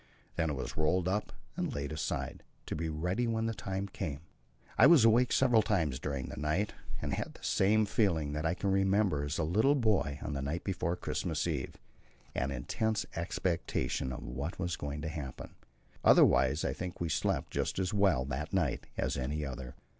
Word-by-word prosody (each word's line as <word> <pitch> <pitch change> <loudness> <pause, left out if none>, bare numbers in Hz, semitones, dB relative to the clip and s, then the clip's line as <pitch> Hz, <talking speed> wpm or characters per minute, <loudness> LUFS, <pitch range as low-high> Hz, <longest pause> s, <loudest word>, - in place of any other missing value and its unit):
Then 80 -1 +1
it - - -1
was 65 - -5
rolled 85 +4 +2
up 100 +3 -1 0.2
and - - -2
laid 70 +1 -3
aside, 80 -2 -3 0.2
to - - -3
be 80 +1 -2
ready 90 +10 -1
when 110 -1 0
the 115 - 0
time 95 -1 -3
came. 80 -7 -5 0.5
I - - +8
was 155 -8 +7
awake 120 +2 +5
several 125 -4 +5
times 80 -12 0
during 70 -3 -3
the - - -8
night, 80 +8 0 0.3
and - - -2
had - - -3
the - - -16
same 110 +3 +3
feeling 85 - +1
that 75 +1 -2
I 80 +1 +1
can 100 +1 -1
remember 95 -5 +2
as 75 +1 -2
a 85 - 0
little 110 - +3
boy 100 - +1
on 75 - -3
the 70 - -2
night 75 +6 -2
before 90 -3 -1
Christmas 85 -3 -2
Eve 75 -6 -3 0.6
an 65 - -1
intense 105 - -1
expectation 85 -5 -1
of 65 - -6
what 70 +8 -4
was 85 -2 -1
going 75 +1 -5
to - - -2
happen. 75 -5 -6 0.5
Otherwise 65 +5 +5
I - - 0
think 90 -1 -6
we 85 - -1
slept 80 - 0
just - - -1
as 95 +2 0
well 95 -11 +3
that 70 +3 -4
night - - 0
as - - 0
any 75 +4 -2
other. 65 0 -6
85 Hz, 190 wpm, -32 LUFS, 70-100 Hz, 0.6 s, I